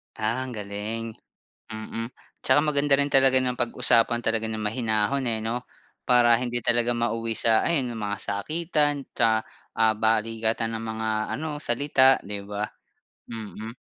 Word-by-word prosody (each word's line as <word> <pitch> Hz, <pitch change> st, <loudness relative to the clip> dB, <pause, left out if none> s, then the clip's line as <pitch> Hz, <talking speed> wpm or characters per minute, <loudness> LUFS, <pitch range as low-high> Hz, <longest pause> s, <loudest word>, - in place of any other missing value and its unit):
Ah, 115 Hz, +4 st, -1 dB
ang 130 Hz, -, -7 dB
galing. 110 Hz, +1 st, -5 dB, 0.6 s
Mm. 110 Hz, +2 st, -6 dB, 0.3 s
Tsaka 130 Hz, -, +4 dB
maganda 145 Hz, -2 st, +3 dB
rin 140 Hz, -, +3 dB
talaga 135 Hz, -1 st, +5 dB
na 125 Hz, -1 st, 0 dB
pag-usapan 120 Hz, -1 st, +2 dB
talaga 115 Hz, 0 st, 0 dB
ng 110 Hz, -, -3 dB
mahinahon, 110 Hz, +4 st, 0 dB
eh, 115 Hz, -2 st, +1 dB
'no? 120 Hz, +3 st, -2 dB, 0.4 s
Para 120 Hz, -1 st, +5 dB
hindi 120 Hz, -1 st, -2 dB
talaga 120 Hz, 0 st, +2 dB
mauwi 115 Hz, -1 st, -1 dB
sa 110 Hz, -1 st, +3 dB
ayon 140 Hz, -7 st, +1 dB
yong 115 Hz, -, -6 dB
mga 100 Hz, -1 st, -3 dB
sakitan 150 Hz, -, -1 dB
tsa 110 Hz, -1 st, +2 dB, 0.4 s
ah, 110 Hz, -1 st, +4 dB
balikatan 115 Hz, 0 st, 0 dB
ng -, -, -7 dB
mga 110 Hz, 0 st, -3 dB, 0.3 s
ano, 150 Hz, 0 st, -4 dB
salita, 130 Hz, +1 st, +3 dB
'di 100 Hz, 0 st, -4 dB
ba? 105 Hz, 0 st, -4 dB, 0.7 s
Mm. 110 Hz, 0 st, -7 dB
115 Hz, 145 wpm, -25 LUFS, 110-130 Hz, 0.7 s, talaga